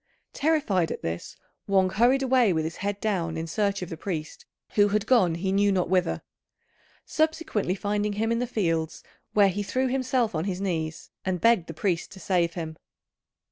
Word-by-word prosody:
Terrified 275 - +1
at - - -6
this, 85 +1 -5 0.3
Wang 190 -1 +3
hurried 245 +7 +3
away 250 -6 +4
with 160 -1 0
his 160 +1 -4
head 200 +1 -3
down 175 -7 -1
in 160 - -3
search 200 +2 -1
of 180 - -7
the - - -3
priest 160 -3 -5 0.2
who 205 -1 +4
had 210 0 0
gone 220 -10 +4
he 190 +3 -2
knew 200 +1 +3
not 180 -3 0
whither; 185 -1 +1 0.8
subsequently 315 - 0
finding 205 +1 -1
him 220 +2 0
in 230 - +1
the 245 - -1
fields, 165 -8 -1 0.3
where 205 -2 +5
he 200 +2 -2
threw 255 +6 0
himself 255 -3 0
on 160 +1 -1
his 190 -2 -2
knees 165 -5 -3
and 185 -1 -1
begged 230 -6 +3
the 165 - -7
priest 175 0 -1
to 190 - -11
save 175 -2 0
him. 160 -2 -5
195 Hz, 185 wpm, -26 LUFS, 170-220 Hz, 0.8 s, where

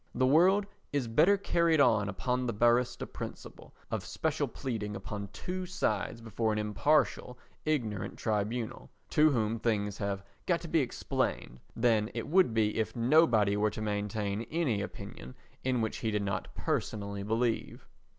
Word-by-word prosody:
The 130 - +3
world 180 +9 +5 0.3
is 140 -4 0
better 160 - +4
carried 170 -4 +2
on 110 -6 +4
upon 125 +5 -1
the 115 - -1
barrister 120 +3 +2
principle - - -9 0.2
of - - -2
special - - -1
pleading 105 -5 -4
upon 100 0 -5
two 185 0 -5
sides 115 - -1
before 115 0 -1
an 105 - -1
impartial 125 +4 +1 0.3
ignorant 120 -10 -1
tribunal, 110 +2 -2 0.2
to 155 +1 +5
whom 115 -4 0
things 105 -3 -1
have 100 -1 -2 0.2
got 170 -2 +2
to 170 - -7
be 165 0 +2
explained, 90 - -2 0.2
than 115 -2 +2
it 115 - -3
would 180 -4 +4
be 110 -1 +1
if 110 - -1
nobody 115 -5 +4
were 105 +1 +2
to 110 - -6
maintain 105 0 -2
any 145 -11 0
opinion 65 -8 -8 0.3
in 125 -2 +1
which 110 - -2
he 110 - -2
did 105 -1 0
not 100 -2 -2
personally 100 -1 -2
believe. 115 +3 -1
115 Hz, 155 wpm, -31 LUFS, 105-140 Hz, 0.3 s, world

